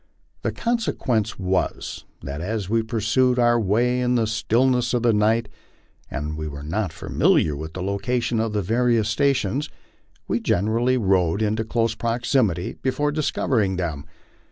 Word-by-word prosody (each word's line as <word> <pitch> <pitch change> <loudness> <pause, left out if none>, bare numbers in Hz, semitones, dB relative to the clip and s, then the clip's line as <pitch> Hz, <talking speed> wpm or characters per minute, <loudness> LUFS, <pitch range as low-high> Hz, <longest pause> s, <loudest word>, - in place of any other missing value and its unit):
The - - -1
consequence 130 - -1
was, 95 -1 -2 0.2
that 70 +2 -5
as 105 +1 -3
we 115 +3 +2
pursued 115 +3 +1
our 120 -1 +4
way 120 +5 +2
in 125 0 +1
the 115 -2 +2
stillness 120 +3 +1
of 120 - 0
the 120 -1 +4
night, 110 +2 +2 0.6
and 75 +1 -4
were 75 -2 -6
not 95 +6 -2
familiar 75 -2 +1
with 80 +2 -7
the 90 - -4
location 120 +4 -1
of 110 0 0
the 105 -1 0
various 115 +1 +2
stations, 135 +2 +1 0.6
we - - 0
generally 115 +7 +1
rode 95 -2 +2
into 110 +1 0
close 115 0 0
proximity 115 -5 0
before 145 +3 0
discovering 125 -9 0
them. 80 -6 -3
110 Hz, 145 wpm, -23 LUFS, 95-125 Hz, 0.6 s, our